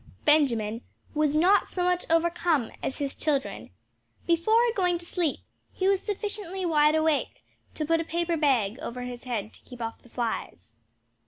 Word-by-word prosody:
Benjamin 235 -8 +3 0.3
was 300 -1 +1
not 365 +6 +4
so 360 - -2
much 360 0 +1
overcome 330 -5 +2
as 265 - -2
his 280 -2 -3
children. 285 -3 -2 0.6
Before 340 +7 +3 0.2
going 360 -3 +2
to 345 - -8
sleep 340 -4 -1 0.3
he 375 - -1
was 390 -1 +3
sufficiently 400 -3 -3
wide 300 -2 +4
awake 315 -1 0 0.3
to 305 - -2
put 330 +1 +2
a - - -2
paper 340 +1 -1
bag 255 -7 +1
over 250 +1 -5
his 245 0 -7
head 220 -4 -3
to - - -12
keep 250 -1 -12
off 225 -1 -5
the 245 - -19
flies. 115 - -4
310 Hz, 165 wpm, -27 LUFS, 250-350 Hz, 0.6 s, not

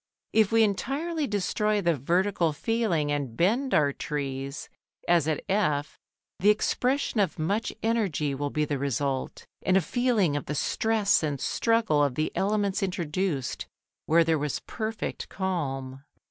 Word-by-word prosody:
If 220 -2 +4
we 225 0 +5
entirely 285 - -1
destroy 210 +1 0
the 170 -3 +2
vertical 170 +3 +1
feeling 175 -6 0
and 140 -6 -3
bend 240 +10 +2
our 145 -2 +3
trees, 140 -1 -4 0.4
as 170 -3 +3
at 155 -2 -1
F, 155 -8 0 0.4
the 205 - +4
expression 250 +4 +1
of 200 - +1
much 200 +8 -1
energy 200 -11 0
will 145 +1 -2
be 150 +1 0
the 145 -2 -2
result, 135 0 -2 0.2
and 185 - +3
a - - +4
feeling 215 - +1
of 145 - -3
the 150 - -2
stress 215 +6 +2
and 145 -3 -2
struggle 220 - +2
of 140 -3 0
the 155 - -1
elements 205 0 0
introduced 175 -5 -2 0.4
where 165 +2 +5
there 160 -1 +1
was 145 -1 -2
perfect 220 -1 -4
calm. 135 -8 -3
175 Hz, 145 wpm, -27 LUFS, 145-215 Hz, 0.4 s, we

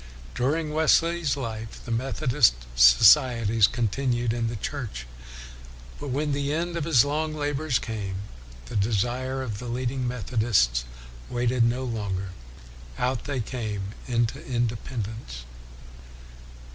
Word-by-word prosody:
During 150 - -1
Wesley's 160 0 +2
life 115 -4 -6
the 120 - -6
Methodist 130 - +2 0.2
societies 110 - +6
continued 120 0 -1
in 115 -1 -1
the 115 - -3
Church, 110 - -5 0.9
but 145 - -6
when 145 +3 -1
the 140 0 -1
end 170 +3 -2
of 165 -3 -2
his 145 -7 +5
long 155 +2 -1
labors 145 -2 0
came, 105 -4 -4 0.5
the - - -8
desire 120 +6 0
of 110 -5 -5
the 125 - -7
leading 125 +1 -2
Methodists 110 - +1 0.4
waited 120 0 +1
no 120 +3 +1
longer. 100 -6 -3 0.7
Out 125 -1 -1
they 140 -4 -2
came 105 -4 -4
into 120 +4 0
independence. 115 - -4
120 Hz, 120 wpm, -26 LUFS, 110-140 Hz, 0.9 s, societies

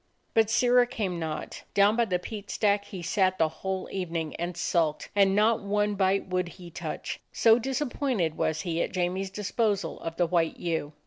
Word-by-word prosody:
But 225 -1 +4
Sirrah 245 +1 +4
came 195 -8 -3
not. 160 -2 -5
Down 205 +2 +5
by 235 0 +3
the 185 -4 0
peat 200 +3 -8
stack 200 -1 +1
he 185 -3 -8
sat 185 0 +2
the 160 - +3
whole 190 +3 -4
evening 165 -4 -3
and 175 0 -4
sulked, 160 -3 0
and 195 -1 +4
not 220 +2 +3
one 205 +1 0
bite 195 0 +1
would 180 -1 0
he 175 -2 -11
touch, - - -5
so 225 0 +5
disappointed 255 - -1
was 160 - 0
he 170 -3 -1
at - - -2
Jamie's 185 +2 -1
disposal 205 +1 -1
of 165 0 -5
the 175 - +2
white 165 -1 +1
ewe. 160 -3 -2
190 Hz, 185 wpm, -28 LUFS, 175-210 Hz, -, Down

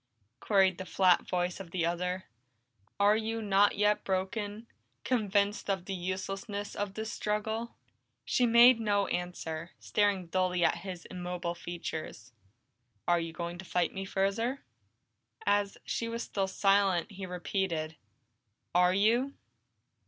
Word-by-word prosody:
queried 190 -3 +3
the - - -3
flat 185 -1 +3
voice 180 0 -1
of 190 -3 -8
the 170 -1 -1
other. 180 +2 -1 0.8
"Are 205 +1 +5
you 225 +1 -2
not 205 -1 +3
yet 210 0 +2
broken, 205 +3 -2 0.4
convinced 205 -4 +1
of 190 -2 -1
the 195 - -4
uselessness 195 +3 -4
of 205 -1 -3
this 220 -1 -4
struggle?" 220 +2 -2 0.5
She 245 - +2
made 235 +1 +7
no 205 -2 +2
answer, 175 -2 -4
staring 205 -3 +1
dully 180 0 +1
at - - +2
his 180 -2 -7
immobile 180 -1 -4
features. 160 - -6 0.7
"Are 175 0 +4
you 165 0 -4
going 170 +1 -5
to - - -6
fight 175 0 0
me 195 - -4
further?" 200 +7 -1 0.8
As 205 0 +1
she 230 - -2
was 230 +1 -3
still 195 -1 -1
silent, 195 -1 +2
he 195 -1 -7
repeated, 175 -3 -2 0.8
"Are 180 +1 +4
you?" 235 +7 +2
195 Hz, 135 wpm, -31 LUFS, 180-210 Hz, 0.8 s, made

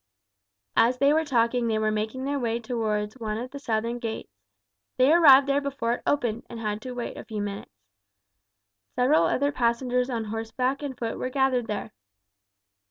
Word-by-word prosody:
As 245 +2 +4
they 280 +2 +4
were 320 +1 +2
talking 240 -4 +1
they 220 -1 +1
were 215 0 +1
making 220 +5 -3
their 285 0 -1
way 235 -2 -1
towards 220 -1 -2
one 215 -2 -3
of 250 +3 -6
the 280 - -7
southern 230 -1 -2
gates. 225 - -5 0.6
They 260 +4 +5
arrived 280 -5 +8
there 280 +1 +1
before 275 -4 -2
it - - -5
opened, 240 -6 0
and 230 - -7
had 210 -1 -3
to 255 +1 -6
wait 245 -1 -5
a - - -7
few 215 -2 -6
minutes. 205 -1 -5 1.2
Several 260 +5 +4
other 285 +2 +1
passengers 250 0 0
on 235 -3 -2
horseback 225 +5 -2
and 275 -3 -5
foot 230 -2 -4
were 255 - -2
gathered 255 -3 +1
there. 210 - -4
240 Hz, 175 wpm, -26 LUFS, 225-265 Hz, 1.2 s, arrived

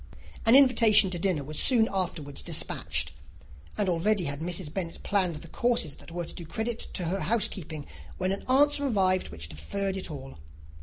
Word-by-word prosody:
An 230 - +7
invitation 230 -8 +6
to 175 - -3
dinner 175 -5 0
was 150 +2 -4
soon 230 -4 +6
afterwards 165 -7 -2
despatched; 75 -1 -1 0.6
and 205 - 0
already 185 +3 +1
had 140 -2 -4
Mrs. 170 -1 -3
Bennet 175 -4 -5
planned 185 -5 +1
the 150 +3 -9
courses 230 - 0
that - - -13
were 175 +1 -5
to - - -7
do 175 - -8
credit 220 +8 -3 0.2
to 180 - -1
her 185 +4 -1
housekeeping, 190 -9 -1 0.3
when 185 0 -1
an 195 - -4
answer 285 +2 +4
arrived 185 -6 +1
which 75 -2 -7
deferred 190 - -3
it 190 - -3
all. 135 - -9
185 Hz, 175 wpm, -27 LUFS, 160-215 Hz, 0.6 s, An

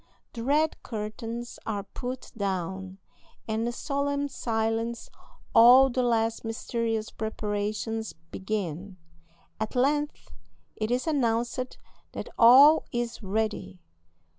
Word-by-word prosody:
The 230 - -5
red 300 +4 +1
curtains 230 +2 -6
are 205 -2 -3
put 255 +4 -7
down, 190 -2 -3 0.5
and 220 +1 -1
in - - -1
solemn 285 +2 -2
silence 225 -1 -2 0.4
all 250 +3 +8
the 255 - 0
last 230 -2 +1
mysterious 225 -1 -2
preparations 215 +1 -3 0.2
begin. 190 -2 -4 0.6
At 220 +4 -3
length 290 +4 0 0.4
it 215 -1 -2
is 245 +1 0
announced 250 -4 -1 0.4
that - - -6
all 275 +7 +8
is 240 -1 -3
ready. 200 - -2
230 Hz, 105 wpm, -27 LUFS, 215-250 Hz, 0.6 s, all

